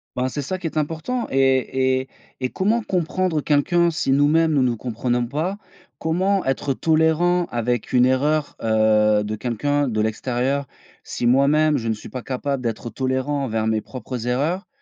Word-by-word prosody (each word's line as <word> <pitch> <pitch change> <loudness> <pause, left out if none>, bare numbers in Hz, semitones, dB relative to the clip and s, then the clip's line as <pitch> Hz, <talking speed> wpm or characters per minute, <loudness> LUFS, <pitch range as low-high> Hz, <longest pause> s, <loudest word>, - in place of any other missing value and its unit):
Ben, 125 +1 0
c'est 145 +2 -4
ça, 185 +7 -4
qui 175 - -3
est 155 - -6
important, 165 +11 -2
et 130 -1 +2
et 130 - -10 0.3
et 130 -1 -1
comment 215 - 0
comprendre 180 -3 -1
quelqu'un, 170 +4 +2
si 155 -4 -1
nous-mêmes, 155 +4 +3
nous 140 - +3
nous 125 -2 +1
comprenons 120 +1 -1
pas? 155 +10 -2 0.4
Comment 185 +5 0
être 135 +1 0
tolérant 160 +3 +2
avec 120 -1 -2
une 125 0 +5
erreur, 145 +4 +1
heu, 110 -1 +3
de 105 +1 -3
quelqu'un 140 +6 -1
de 110 -3 0
l'extérieur, 125 +5 -1 0.4
si - - -4
moi-même 145 +4 +4
je 115 -3 -4
ne 110 - +1
suis 105 - -11
pas 130 - -6
capable 135 +1 -3
d'être 115 0 -4
tolérant 130 +2 -1
envers 110 -3 -1
mes 110 -1 +1
propres 125 -1 -6
erreurs? 150 +10 -1
135 Hz, 170 wpm, -22 LUFS, 120-155 Hz, 0.4 s, une